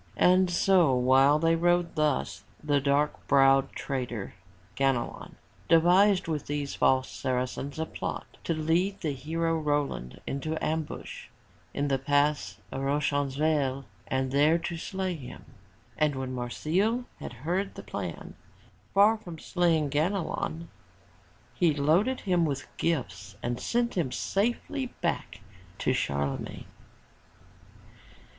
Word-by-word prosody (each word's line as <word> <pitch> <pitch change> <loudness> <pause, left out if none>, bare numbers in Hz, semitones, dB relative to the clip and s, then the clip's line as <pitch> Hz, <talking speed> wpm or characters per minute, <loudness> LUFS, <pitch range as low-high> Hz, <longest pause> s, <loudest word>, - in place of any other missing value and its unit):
And 185 0 +5
so 175 -5 +4
while 130 +3 +5
they 165 +1 +3
rode 175 +1 +2
thus, 150 - 0 0.2
the 145 -2 +2
dark 145 +2 0
browed 135 0 +5
traitor, 125 -7 -4 0.4
Ganelon 135 -3 -1 0.3
devised 180 +4 +5
with 155 -3 -3
those 145 -1 -3
false 130 0 +2
Saracens 130 +3 -3
a 160 - -1
plot - - -5 0.2
to 165 - 0
lead 175 +6 0
the 155 -4 -1
hero 165 +5 -1
Roland 145 - -2
into 155 +4 -3
ambush 160 -1 -4 0.4
in 145 +1 -1
the 135 -1 +1
Pass 145 +2 +1
of 135 - -4
Roncesvalles 140 0 0 0.2
and 130 0 -1
there 150 +4 +4
to 170 +1 -4
slay 190 +2 -3
him. 130 -6 -9 0.5
And 150 -2 +2
when 130 -1 -4
Marsile 180 - 0
had - - -7
heard 190 +4 -1
the - - -8
plan, - - -6 0.6
far 210 +3 +6
from 175 -6 -9
slaying 165 -3 +1
Ganelon, 165 0 -1 0.9
he 165 -4 +2
loaded 170 - +2
him 180 -3 +2
with 140 -4 -2
gifts 105 - -2
and 120 0 -2
sent 235 0 0
him 160 -9 0
safely 240 - -1
back 170 -9 -2 0.4
to - - +1
Charlemagne. 70 0 -2
150 Hz, 125 wpm, -28 LUFS, 135-175 Hz, 0.9 s, far